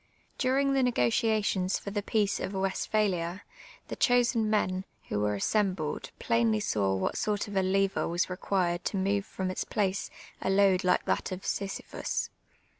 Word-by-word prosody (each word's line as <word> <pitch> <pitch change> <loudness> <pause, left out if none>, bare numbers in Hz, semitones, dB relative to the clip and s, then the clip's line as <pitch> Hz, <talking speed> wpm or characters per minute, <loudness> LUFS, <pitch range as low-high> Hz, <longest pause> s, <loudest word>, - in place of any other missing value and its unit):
During 275 +1 +2
the 270 - +3
negotiations 205 - +1
for 200 - -7
the 205 0 -1
peace 205 -1 0
of 195 - -4
Westphalia, 190 -2 0 0.4
the - - -5
chosen 240 -3 +3
men, 185 -3 +1 0.3
who 105 - -1
were 105 0 +1
assembled, 185 - -1
plainly 230 -2 +2
saw 100 - 0
what 95 - -1
sort 210 -1 -1
of 205 - -7
a 190 - +3
lever 195 +1 +1
was 175 +1 0
required 180 -1 -1
to 200 - -1
move 200 +1 0
from 185 -1 -3
its - - -2
place 195 -2 -1 0.3
a - - -1
load 195 -1 +4
like 180 - +2
that - - -1
of 185 +1 -6
Sisyphus. 195 -1 -3
195 Hz, 160 wpm, -29 LUFS, 185-215 Hz, 0.4 s, load